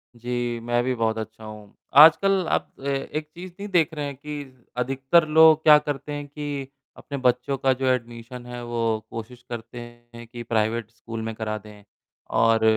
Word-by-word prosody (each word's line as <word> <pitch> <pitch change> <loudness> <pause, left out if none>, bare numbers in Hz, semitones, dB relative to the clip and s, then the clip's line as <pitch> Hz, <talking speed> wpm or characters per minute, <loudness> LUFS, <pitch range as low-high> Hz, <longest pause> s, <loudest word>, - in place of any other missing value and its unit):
जी, 120 0 -3
मैं 120 0 +1
भी 130 +1 0
बहुत 110 -1 0
अच्छा 110 0 -7
हूँ। 105 -1 -11 0.2
आजकल 185 +4 +7
आप - - 0
अ, - - -13
एक 145 +2 -3
चीज़ 180 +1 -8
नहीं 205 - -5
देख 170 -3 +2
रहे 150 -2 -3
हैं 140 - -5
कि, 140 -3 -9
अधिकतर 135 +6 +2
लोग 160 0 +6
क्या 150 -1 +9
करते 145 0 -5
हैं 145 0 -5
कि 145 -2 -5 0.3
अपने 140 - -6
बच्चों 125 +2 +1
का 135 0 +2
जो 135 - -1
एडमिशन 120 0 -6
है, 125 0 -7
वो 115 -2 -1
कोशिश 120 +2 -8
करते 120 +1 -7 0.4
हैं 120 0 -9
कि 120 0 -8
प्राइवेट 115 0 -1
स्कूल 115 -1 -7
में 110 0 -4
करा 110 -1 -3
दें। 105 0 -14 0.5
और 115 0 +3
125 Hz, 185 wpm, -24 LUFS, 115-145 Hz, 0.5 s, क्या